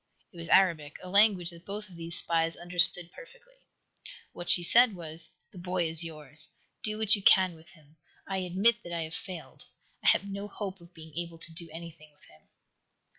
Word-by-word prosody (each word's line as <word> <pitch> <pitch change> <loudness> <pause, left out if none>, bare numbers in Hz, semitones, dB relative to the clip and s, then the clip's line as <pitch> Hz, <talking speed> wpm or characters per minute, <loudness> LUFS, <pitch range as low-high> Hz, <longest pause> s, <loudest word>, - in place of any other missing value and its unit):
It - - -16
was 165 0 -7
Arabic, 165 -6 +2
a 185 - -9
language 200 -3 +3
that 170 0 -15
both 205 +2 -8
of 185 - -16
these 170 0 +2
spies 165 0 0
understood 175 0 +5
perfectly. - - -17 0.8
What 175 0 -7
she 175 0 +9
said 235 +4 +4
was: 160 -1 -10 0.2
"The 185 - -13
boy 180 -1 -2
is 160 +1 -4
yours. 155 -2 -8 0.4
Do 215 0 -4
what 220 +1 +4
you 205 - -7
can 185 -2 +4
with 160 0 -18
him. 155 -3 -23 0.3
I 195 - -3
admit 195 +6 0
that 175 - -9
I 165 -1 -3
have 160 0 -9
failed. 180 -2 -10 0.4
I - - -2
have - - +4
no 200 +1 -7
hope 195 -2 -8
of 170 +1 -19
being 160 -2 -14
able 170 0 -6
to 165 0 -9
do 165 0 -9
anything 160 -2 -12
with - - -20
him." 75 - -22
175 Hz, 200 wpm, -28 LUFS, 165-195 Hz, 0.8 s, she